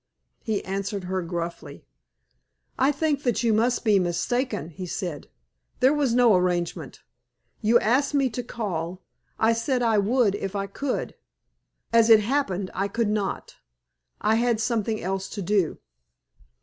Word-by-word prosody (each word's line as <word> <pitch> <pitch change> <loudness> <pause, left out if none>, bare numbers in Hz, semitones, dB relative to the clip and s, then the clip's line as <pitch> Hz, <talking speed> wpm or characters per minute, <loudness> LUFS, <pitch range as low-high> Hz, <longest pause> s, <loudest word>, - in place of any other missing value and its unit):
He 215 -4 -2
answered 195 0 -3
her 185 +1 -2
gruffly. 170 0 -6 0.9
"I 265 +2 +3
think 295 -1 0
that 245 -2 0
you 230 -2 +3
must 235 +3 +1
be 210 -3 +5
mistaken," 200 - -1
he 180 +3 -7
said. 170 -3 -5 0.5
"There 260 +2 +5
was 280 -6 +1
no 240 -4 +5
arrangement. 180 -2 -1 0.6
You 230 +2 +4
asked 265 +6 +1
me 275 -2 +3
to 245 - -3
call; 185 -7 -4 0.3
I 225 +1 +3
said 245 +2 0
I 225 -3 +3
would 220 0 +2
if 200 -1 -4
I 200 0 -1
could. 255 +7 -3 0.8
As 230 0 +5
it 220 -1 +8
happened, 205 -6 -1
I 195 +2 -1
could 225 +1 -1
not; 210 -2 -3 0.6
I 215 +1 +2
had 240 -2 +1
something 220 -2 -1
else 190 +1 -3
to 205 - -5
do." 190 -3 +1
215 Hz, 150 wpm, -25 LUFS, 190-245 Hz, 0.9 s, it